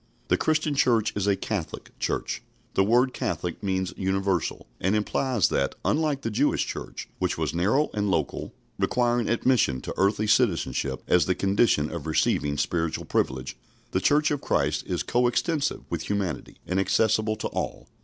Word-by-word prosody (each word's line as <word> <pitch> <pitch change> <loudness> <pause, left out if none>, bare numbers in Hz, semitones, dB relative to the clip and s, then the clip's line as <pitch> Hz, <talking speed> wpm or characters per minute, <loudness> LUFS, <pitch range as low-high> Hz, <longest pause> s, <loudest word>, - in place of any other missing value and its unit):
The - - +5
Christian 155 -1 +1
Church 115 -5 +2
is 100 -1 -1
a 100 - +4
Catholic 95 -5 -4
Church. - - -2 0.3
The 95 - +3
word 125 +5 +3
"Catholic" 90 -2 -3
means 95 -2 -1
universal, 95 -2 -1
and 95 +3 +1
implies 110 +1 +1
that, 70 - 0
unlike 150 -3 +1
the 115 - -2
Jewish 130 +8 +2
Church, - - -6
which - - 0
was - - -1
narrow 105 - +2
and 105 -1 0
local, - - -1 0.3
requiring 120 -2 +1
admission 120 - +2
to - - -5
earthly 100 +2 +2
citizenship 90 - +1
as 90 -3 +4
the 90 - +2
condition 95 -6 +2
of 80 -3 -5
receiving 75 -2 +1
spiritual 80 +2 -1
privilege, 65 0 -1 0.4
the 95 - 0
Church 150 +6 +3
of 145 - -1
Christ - - 0
is - - -1
coextensive 125 +6 0
with - - -3
humanity, 100 -8 -2
and 90 +1 0
accessible 110 +2 +2
to 105 - -3
all. - - -4
105 Hz, 160 wpm, -26 LUFS, 90-120 Hz, 0.4 s, The